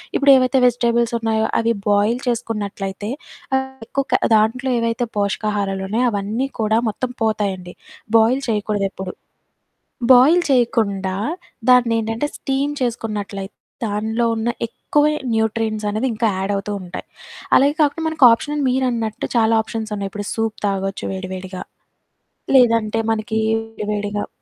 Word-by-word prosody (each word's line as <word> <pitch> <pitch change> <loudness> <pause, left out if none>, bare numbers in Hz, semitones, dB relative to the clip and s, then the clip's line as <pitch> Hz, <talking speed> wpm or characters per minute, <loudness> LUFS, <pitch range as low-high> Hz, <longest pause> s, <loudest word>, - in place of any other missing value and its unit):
ఇప్పుడేవైతే 265 -1 +5
vegetables 235 -1 +2
ఉన్నాయో 220 -1 0
అవి 230 0 +1 0.2
boil 205 +4 +2
చేసుకున్నట్లయితే, 210 -4 -3 0.8
ఎక్కువ 275 +2 -1
కా - - +4 0.2
దాంట్లో 230 +5 +1
ఏవైతే 230 +1 -1
పోషకాహారాలు 200 -1 -1
ఉన్నాయో, 230 +5 +1
అవన్నీ 210 +6 -2
కూడా 220 +1 +2
మొత్తం 250 +4 -3
పోతాయండి. 195 -5 -1 0.4
బాయిల్ 240 +5 +3
చేయకూడదు 210 -2 0
ఎప్పుడు. 190 -1 -6 1.0
బాయిల్ 300 +8 +6
చేయకుండా 200 -6 +1 0.5
దాన్ని 245 -2 +5
ఏంటంటే, 225 +6 -2
స్టీమ్ 275 +1 -1
చేసుకున్నట్లయితే 210 -4 -3 0.3
దాన్లో 220 +3 -1
ఉన్న 225 +1 -1 0.2
ఎక్కువే 295 +6 +1 0.2
న్యూట్రియంట్స్ 220 -1 -1
అనేవి 215 +5 -1
ఇంకా 225 +1 0
యాడ్ 195 +1 -2
అవుతుంటాయి. 195 -3 -5 0.5
అలాగే 285 +2 +3
కాకుండా 305 +2 +1
మనకు 310 -4 +4
ఆప్షన్ 295 +3 -2
మీరన్నట్టు 240 -4 -1
చాలా 225 0 +3
ఆప్షన్సున్నాయి. 215 -3 -4
ఇప్పుడు 205 -1 -5
సూప్ 225 -1 -2
తాగొచ్చు 195 0 -2
వేడి 190 -1 -5
వేడిగా, 185 0 -7 0.9
లేదంటే 230 -3 +4
మనకి 220 0 -2 0.5
వేడిగా 205 0 -2
220 Hz, 120 wpm, -20 LUFS, 205-245 Hz, 1.0 s, బాయిల్